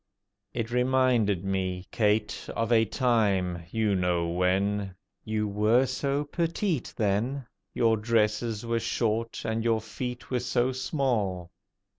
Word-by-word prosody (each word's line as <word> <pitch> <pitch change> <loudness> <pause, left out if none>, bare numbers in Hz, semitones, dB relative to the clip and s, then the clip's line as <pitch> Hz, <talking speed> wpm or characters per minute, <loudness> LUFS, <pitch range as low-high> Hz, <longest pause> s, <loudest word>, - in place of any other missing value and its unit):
It 115 -1 -3
reminded 125 -6 +2
me, 95 -1 -2
Kate, 105 -2 0
of 115 +1 -1
a 115 -1 +5
time—you 100 - +1
know 90 -2 +1
when! 95 +2 0 0.3
You 110 -1 -1
were 105 +5 +3
so 140 +2 -1
petite 165 - -1
then, 115 +6 0 0.3
Your 115 -1 +3
dresses 110 0 0
were 115 0 0
short, 115 0 -1
and 110 0 -1
your 115 -1 +2
feet 120 +4 -6
were 125 - +1
so 125 +1 +1
small. 115 - -1
110 Hz, 120 wpm, -28 LUFS, 100-125 Hz, 0.3 s, a